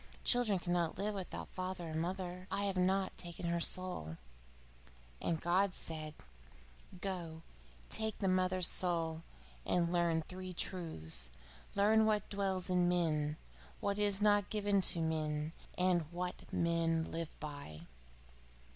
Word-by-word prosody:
Children 245 -5 +4
cannot 175 -2 -1
live 210 +1 -1
without 190 -3 -5
father 185 -2 -4
or - - -5
mother." 180 +2 -3
I 200 - -1
have 200 -1 0
not 190 +1 +1
taken 170 0 -5
her 170 0 +1
soul.' 170 - 0 1.0
And 165 -2 0
God 185 +3 +2
said: 155 -1 -3 0.8
'Go 170 -4 -4 0.4
take 220 -1 +4
the 195 - -1
mother's 185 -1 +3
soul, 165 -3 +1 0.4
and 175 -1 +1
learn 170 -2 +2
three 185 +2 -7
truths: 80 - 0 0.5
Learn 215 +2 +5
What 210 -2 +1
dwells 195 -2 -1
in 180 -1 +3
man, 155 -4 +1 0.4
What 200 0 -1
is 205 -1 +3
not 205 -1 +4
given 205 -2 +2
to 170 - +1
man, 155 -1 -1 0.2
and 175 -3 +2
What 180 +1 -5
men 165 -1 +1
live 165 -1 -5
by. 145 - -7
180 Hz, 130 wpm, -35 LUFS, 165-190 Hz, 1.0 s, Learn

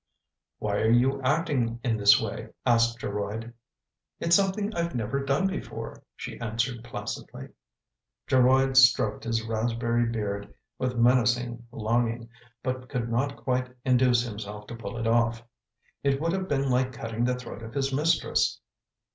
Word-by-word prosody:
" - - -62
Why 100 -1 -1
are 110 - +2
you 130 +4 +3
acting 130 -5 0
in 120 -4 +1
this 100 -2 +6
way? - - -5
" - - -49
asked 115 -1 +3
Geroid. 105 +3 -4 0.3
" - - -61
It's 170 0 +4
something 200 +2 +1
I've 170 -4 -2
never 125 +4 -1
done 140 +8 +1
before/' 190 - -6
she - - -7
answered 115 +1 -2
placidly. 120 - -6 0.8
Geroid 130 +1 +4
stroked 125 -5 +5
his 115 -1 -1
raspberry 115 +1 0
beard 105 -3 -3 0.3
with 125 -1 -1
menacing 120 0 +2
longing 115 0 -1 0.3
but 130 0 -3
could 120 -3 -2
not 140 +4 0
quite 125 -1 -1
induce 125 -2 +4
himself 105 -2 -7
to 120 - -8
pull 115 +1 -7
it 115 - -3
off. 115 0 +2 0.6
It 140 -1 +1
would 165 +2 0
have 190 +1 -2
been 135 -3 0
like 130 +1 +1
cutting 115 -1 -3
the 125 +1 +2
throat 125 -2 -8
of 115 +3 -9
his 135 -1 0
mistress. 155 +5 +1
120 Hz, 155 wpm, -27 LUFS, 115-130 Hz, 0.8 s, this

